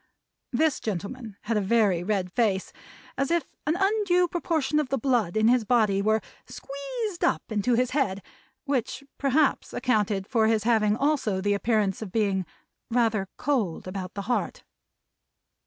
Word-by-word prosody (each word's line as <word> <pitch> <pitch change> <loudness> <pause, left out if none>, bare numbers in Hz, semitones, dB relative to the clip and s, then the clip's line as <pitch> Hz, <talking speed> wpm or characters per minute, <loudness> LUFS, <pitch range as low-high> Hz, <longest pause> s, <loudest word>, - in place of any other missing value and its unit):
This 300 +3 +2
gentleman 215 +2 -5
had 225 0 -1
a - - +2
very 200 -4 +2
red 190 -2 -1
face, 200 -4 0 0.5
as 275 - +1
if 340 -1 -1
an 310 - +2
undue 390 -3 +2
proportion 315 -4 0
of 295 -4 -1
the 270 - 0
blood 230 -7 +1
in 220 0 +4
his 245 0 +4
body 215 -4 +2
were 215 +1 +2 0.3
squeezed 345 - -5
up - - +2
into 215 +3 +1
his 250 +1 +1
head, 200 -9 0 0.4
which 270 -1 -2 0.2
perhaps 280 +1 +1
accounted 210 -6 0
for 220 -1 +2
his 220 -2 +2
having 215 -2 +3
also 275 -9 +1
the 205 +2 +1
appearance 205 -2 0
of 210 -4 -6
being 195 -4 0 0.4
rather 225 -5 +1
cold 220 - -1
about 185 -1 -6
the 200 - -4
heart. 240 +4 -2
225 Hz, 155 wpm, -26 LUFS, 200-275 Hz, 0.5 s, in